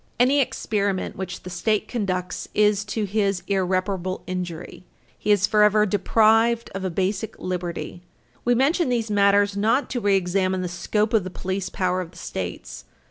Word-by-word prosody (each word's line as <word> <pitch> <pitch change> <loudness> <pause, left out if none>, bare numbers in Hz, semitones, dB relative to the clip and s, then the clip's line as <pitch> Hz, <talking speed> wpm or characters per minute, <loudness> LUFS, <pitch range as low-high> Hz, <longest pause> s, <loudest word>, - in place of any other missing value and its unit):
Any 265 +4 +4
experiment 200 -6 -1
which 185 -1 -6
the 180 - -8
State 210 +4 0
conducts 185 -6 -3
is 210 -1 +3
to 215 +1 -2
his 200 -2 0
irreparable 185 -1 -1
injury. 180 -2 -6 0.3
He 210 - -5
is 205 -2 +5
forever 210 0 +4
deprived 225 +3 +3
of 195 0 -5
a 190 - -1
basic 195 +4 -2
liberty. 175 -1 -4 0.4
We 245 0 +3
mention 285 +5 +2
these 230 -3 -1
matters 200 0 +3
not 225 +7 +1
to 250 - -1
reexamine 190 -1 +1
the - - -2
scope 210 +5 -1
of 220 -4 +3
the 185 - -5
police 185 +1 -4
power 185 0 -1
of 175 - -7
the 170 - -18
States. 85 - -6
200 Hz, 160 wpm, -23 LUFS, 185-215 Hz, 0.4 s, is